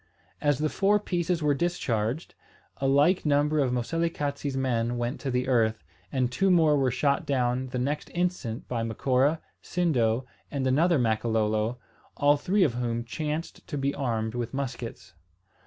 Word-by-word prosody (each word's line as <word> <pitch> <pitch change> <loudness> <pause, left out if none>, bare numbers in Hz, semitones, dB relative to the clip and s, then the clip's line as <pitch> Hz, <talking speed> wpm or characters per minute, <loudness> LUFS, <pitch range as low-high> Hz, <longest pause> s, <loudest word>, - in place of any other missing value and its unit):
As 145 -2 +2
the 155 +2 +1
four 200 +6 +2
pieces 175 -4 -1
were 150 -1 +3
discharged, 135 -5 -1 0.4
a 135 - 0
like 145 +7 +4
number 150 +1 +2
of 135 -3 +2
Moselekatse's 145 +1 -2
men 120 -2 0
went 120 +3 -2
to 140 - -3
the 125 0 0
earth; 110 - +2 0.3
and 130 -2 0
two 195 +10 +2
more 160 -4 +5
were 135 -2 +2
shot 140 +3 +1
down 130 -1 0
the 125 - -4
next 140 +4 -2
instant 175 -10 -2
by 120 -2 -2
Macora, 130 +6 +1 0.2
Sindo, 125 -9 +1 0.2
and 140 -2 -2
another 155 +6 +3
Makololo, 110 -1 +1 0.4
all 145 +1 +5
three 185 +7 +2
of 140 - +2
whom 120 -1 -2
chanced 155 +5 -4
to 145 - -4
be 140 0 0
armed 115 -5 -2
with 120 +1 -4
muskets. 125 -7 -5
135 Hz, 155 wpm, -27 LUFS, 120-150 Hz, 0.4 s, more